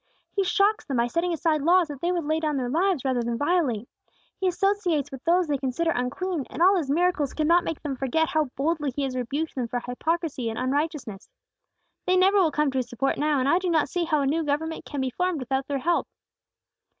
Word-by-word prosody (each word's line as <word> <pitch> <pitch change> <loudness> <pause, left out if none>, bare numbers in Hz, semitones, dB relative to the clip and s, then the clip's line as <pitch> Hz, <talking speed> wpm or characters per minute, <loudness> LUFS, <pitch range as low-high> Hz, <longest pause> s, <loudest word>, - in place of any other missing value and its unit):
"He 395 - +1
shocks 405 +3 +2
them 270 -4 -3
by 235 - +3
setting 335 +8 -1
aside 320 -2 +1
laws 340 +1 +3
they 345 - +1
would 350 -2 -1
lay 310 +2 0
down 305 -3 -1
their 250 -2 -2
lives 345 -2 +1
rather 255 -2 +1
than 235 0 -2
violate. 285 - 0 0.5
He 380 - +1
associates 365 -5 0
with 270 -1 -9
those 350 +2 +3
they 290 -3 -1
consider 275 +5 0
unclean; 295 +5 -2
and - - -8
all 375 +3 +6
His 320 -7 -1
miracles 335 -2 +1
cannot 335 +3 +3
make 325 - -5
them 285 -3 -2
forget 275 +5 0
how 310 -1 +1
boldly 300 +1 0
He 285 - -1
has 265 -2 -2
rebuked 275 +6 -2
them 250 -3 -2
for 245 +1 -2
hypocrisy 275 0 -2
and 225 - -5
unrighteousness. 270 - -2 0.8
They 370 0 +4
never 385 +2 +4
will 350 -4 +4
come 300 -1 +1
to 265 - 0
His 250 - -3
support 270 +3 -1
now; 300 0 +2
and 260 - +1
I 340 +5 +4
do 370 -1 -2
not 320 -3 +2
see 350 -1 -1
how 305 -3 +1
a - - 0
new 315 +4 +1
government 315 +2 -2
can 285 -3 -4
be 260 -1 -1
formed 360 +3 -1
without 265 +1 -2
their 285 - -1
help." 335 +6 0
305 Hz, 225 wpm, -25 LUFS, 265-345 Hz, 0.8 s, all